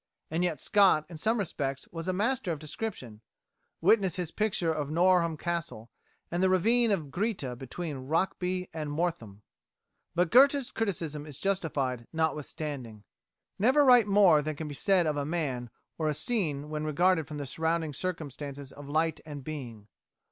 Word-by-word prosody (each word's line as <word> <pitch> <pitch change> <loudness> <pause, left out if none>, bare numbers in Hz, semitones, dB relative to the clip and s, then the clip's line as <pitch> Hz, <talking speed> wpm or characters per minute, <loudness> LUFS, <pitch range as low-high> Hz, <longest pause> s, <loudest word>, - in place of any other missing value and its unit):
And 165 +2 0
yet 170 -4 0
Scott 195 -7 +4
in 165 - -8
some 220 +8 +1
respects 140 -8 -3
was 165 0 -6
a - - +2
master 210 +1 0
of 160 - -2
description 150 - -6 0.6
witness 195 0 +4
his 180 -4 -3
picture 190 -6 0
of 150 -2 -3
Norham 170 0 +3
Castle 165 -10 -4 0.4
and 175 - -1
of - - +1
the 190 - +4
ravine 230 +6 +3
of 165 -9 -1
Greeta 180 - -2
between 135 +1 -6
Rokeby 180 +3 -1
and 155 -2 -4
Mortham. 145 - -3 0.7
But 175 -1 +2
Goethe's 275 +1 +5
criticism 160 -9 -3
is 145 -3 -8
justified 145 -10 -1
notwithstanding. 150 -8 -3 0.6
Never 265 +8 +5
write 245 -4 +7
more 195 -6 +6
than 155 +1 -3
can 155 +1 -5
be 145 - -6
said 185 +4 +2
of 150 -2 0
a 145 - 0
man 140 -6 -2 0.3
or 155 - 0
a 150 - 0
scene 150 - -1
when 150 0 -2
regarded 160 +1 +2
from 150 - -6
the 145 - -4
surrounding 160 +2 -1
circumstances 145 -4 -5
of 145 0 -11
light 160 +2 +1
and 145 -3 -8
being. 125 -8 -7
160 Hz, 165 wpm, -29 LUFS, 145-185 Hz, 0.7 s, write